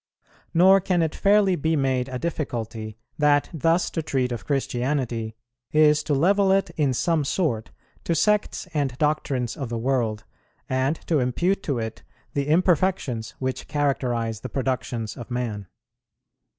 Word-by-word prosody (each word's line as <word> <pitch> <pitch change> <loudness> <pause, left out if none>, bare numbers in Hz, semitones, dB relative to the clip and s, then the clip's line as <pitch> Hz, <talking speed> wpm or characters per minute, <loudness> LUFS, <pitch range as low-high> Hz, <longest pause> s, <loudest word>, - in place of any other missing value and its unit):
Nor 190 +3 +6
can 180 -2 +1
it 160 - -1
fairly 200 -2 +3
be 160 +1 0
made 130 -3 0
a 130 - -3
difficulty 115 -8 -4 0.2
that 145 -1 +3
thus 165 +3 +1
to 165 - -2
treat 130 -4 -1
of 120 - -5
Christianity 125 -4 -1 0.4
is 150 -1 +5
to 145 - +1
level 195 +6 +3
it 195 -3 +2
in 150 -5 +1
some 155 +4 +1
sort 135 - -1 0.4
to 170 - +1
sects 210 +2 +1
and 140 -5 -1
doctrines 145 -5 0
of 135 -6 -5
the 115 - -2
world, 115 -3 0 0.4
and 130 +3 +1
to 160 -3 +2
impute 175 +11 0
to 140 -8 -2
it 110 -1 -4 0.3
the 140 0 -1
imperfections 165 - +1
which 130 0 -3
characterize 125 -6 -1
the 125 - -7
productions 125 -4 -2
of 120 - -9
man. 115 -6 -3
140 Hz, 150 wpm, -24 LUFS, 120-165 Hz, 0.4 s, Nor